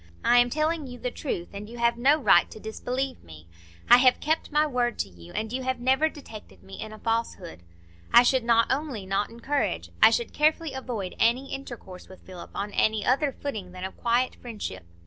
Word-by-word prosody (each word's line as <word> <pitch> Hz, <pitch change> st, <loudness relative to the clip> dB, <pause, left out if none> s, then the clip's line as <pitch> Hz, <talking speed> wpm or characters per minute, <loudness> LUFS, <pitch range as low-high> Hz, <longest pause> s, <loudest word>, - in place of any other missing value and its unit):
I 245 Hz, -, +6 dB
am 245 Hz, 0 st, +4 dB
telling 310 Hz, +2 st, -1 dB
you 245 Hz, -1 st, -9 dB
the 245 Hz, +1 st, -4 dB
truth, 175 Hz, -, -4 dB
and 205 Hz, +1 st, -8 dB
you 240 Hz, -, -10 dB
have 235 Hz, 0 st, +2 dB
no 270 Hz, +6 st, +4 dB
right 205 Hz, -, +4 dB
to -, -, -11 dB
disbelieve 250 Hz, +4 st, -4 dB
me; 80 Hz, 0 st, -14 dB, 0.4 s
I -, -, +9 dB
have 255 Hz, 0 st, +4 dB
kept 315 Hz, +2 st, -1 dB
my 300 Hz, +1 st, +3 dB
word 245 Hz, -4 st, -1 dB
to 100 Hz, -, -2 dB
you, 85 Hz, -2 st, -14 dB
and 220 Hz, +2 st, -3 dB
you 260 Hz, -, -2 dB
have 260 Hz, -1 st, -2 dB
never 265 Hz, +5 st, +2 dB
detected 215 Hz, -, -12 dB
me 95 Hz, 0 st, -10 dB
in 220 Hz, -, -7 dB
a 215 Hz, -, -10 dB
falsehood. 225 Hz, -, -3 dB, 0.5 s
I 240 Hz, -, +8 dB
should 255 Hz, 0 st, +2 dB
not 230 Hz, 0 st, +3 dB
only 265 Hz, -8 st, -2 dB
not 195 Hz, +2 st, -1 dB
encourage, 230 Hz, -, -2 dB
I -, -, +9 dB
should 230 Hz, +1 st, -1 dB
carefully 310 Hz, 0 st, +1 dB
avoid, 235 Hz, -8 st, -5 dB
any 250 Hz, +4 st, +1 dB
intercourse 240 Hz, -9 st, -9 dB
with 190 Hz, -, -14 dB
Philip 185 Hz, -2 st, -11 dB
on 205 Hz, +1 st, -3 dB
any 215 Hz, 0 st, +1 dB
other 275 Hz, +3 st, +2 dB
footing 215 Hz, -10 st, -6 dB
than 185 Hz, 0 st, -8 dB
of 190 Hz, -, -5 dB
quiet 240 Hz, +2 st, +1 dB
friendship. 205 Hz, -, -7 dB
235 Hz, 205 wpm, -26 LUFS, 200-265 Hz, 0.5 s, I